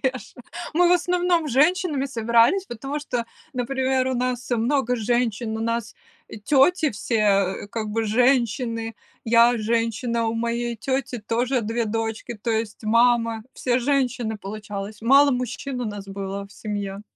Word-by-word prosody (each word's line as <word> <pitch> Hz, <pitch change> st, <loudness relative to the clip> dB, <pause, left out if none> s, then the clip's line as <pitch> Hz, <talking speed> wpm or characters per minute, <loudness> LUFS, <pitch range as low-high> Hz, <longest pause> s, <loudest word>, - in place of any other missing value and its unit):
Реже. 260 Hz, -2 st, -3 dB, 0.4 s
Мы 350 Hz, +1 st, +5 dB
в -, -, +5 dB
основном 355 Hz, -2 st, +2 dB
женщинами 295 Hz, +1 st, +2 dB
собирались, 235 Hz, -, +3 dB
потому 270 Hz, +6 st, -5 dB
что, 245 Hz, -5 st, -3 dB, 0.3 s
например, 260 Hz, 0 st, 0 dB
у 260 Hz, -, -1 dB
нас 250 Hz, 0 st, -2 dB
много 245 Hz, +1 st, +1 dB
женщин, 225 Hz, -1 st, -1 dB
у -, -, -5 dB
нас, 230 Hz, 0 st, -2 dB, 0.3 s
э, -, -, -9 dB
тети 295 Hz, -, +3 dB
все 205 Hz, -3 st, 0 dB
как 220 Hz, -2 st, -3 dB
бы 225 Hz, +1 st, -1 dB
женщины, 230 Hz, -1 st, +1 dB, 0.3 s
я 235 Hz, +1 st, +5 dB
женщина, 230 Hz, +1 st, 0 dB
у 225 Hz, -, -1 dB
моей 235 Hz, +1 st, -1 dB
тети 260 Hz, +1 st, -2 dB
тоже 240 Hz, +4 st, 0 dB
2 225 Hz, +2 st, -1 dB
дочки, 225 Hz, +2 st, -3 dB
то 220 Hz, +3 st, -4 dB
есть 220 Hz, -1 st, -2 dB
мама. 230 Hz, 0 st, +3 dB
Все 250 Hz, -1 st, 0 dB
женщины 250 Hz, -4 st, 0 dB
получалось. 205 Hz, 0 st, -7 dB
Мало 275 Hz, +4 st, +6 dB
мужчин 250 Hz, +1 st, -3 dB
у 245 Hz, -, -2 dB
нас 205 Hz, -2 st, -6 dB
было 195 Hz, 0 st, -5 dB
в 200 Hz, -, -18 dB
семье. 205 Hz, -2 st, -5 dB
235 Hz, 145 wpm, -23 LUFS, 220-260 Hz, 0.4 s, Мало